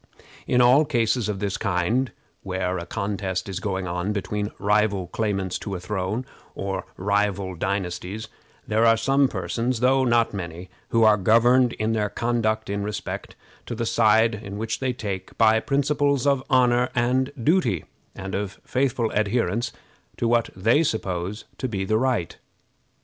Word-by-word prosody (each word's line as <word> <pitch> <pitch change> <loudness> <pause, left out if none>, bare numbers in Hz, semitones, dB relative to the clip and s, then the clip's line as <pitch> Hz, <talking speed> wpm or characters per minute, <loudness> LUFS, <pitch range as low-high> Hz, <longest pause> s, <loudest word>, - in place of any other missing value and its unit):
In 125 - +3
all 125 +5 +6
cases 120 -5 0
of 105 - -2
this 100 0 -2
kind, 110 +6 0 0.3
where 95 -1 -2
a 85 - -7
contest 95 -1 -3
is 95 -2 -4
going 95 -2 -2
on 90 +3 -2
between 105 +1 -2
rival 105 -2 +1
claimants 95 -1 -2
to 100 -2 -5
a - - -4
throne, 100 +5 -3 0.3
or 95 -1 -3
rival 100 -1 0
dynasties, 95 +3 -3 0.4
there 110 +1 +2
are 115 0 +5
some 135 +4 +3
persons, 120 -1 -2
though 130 +2 +3
not 120 -3 +2
many, 85 -1 -6 0.2
who 115 -1 +3
are 110 -1 +6
governed 120 +5 +4
in 110 +1 -1
their 105 -2 0
conduct, 110 -2 0
in 100 0 -2
respect 105 0 -5 0.3
to 120 - -4
the 115 +1 -2
side 110 -2 +2
which 110 +2 -3
they 130 -1 0
take, 100 -6 -5
by 110 0 +5
principles 140 +1 +1
of 140 -2 +3
honor 125 -2 +3
and 125 +2 +1
duty, 120 - +1 0.3
and 95 0 -6
of 100 -1 -3
faithful 125 -3 0
adherence 110 +1 0 0.5
to 120 - 0
what 120 0 +2
they 115 +10 +3
suppose 100 - -2
to 130 - -1
be 95 -5 -3
the 110 +3 +2
right. 125 -9 0
110 Hz, 155 wpm, -24 LUFS, 95-120 Hz, 0.5 s, all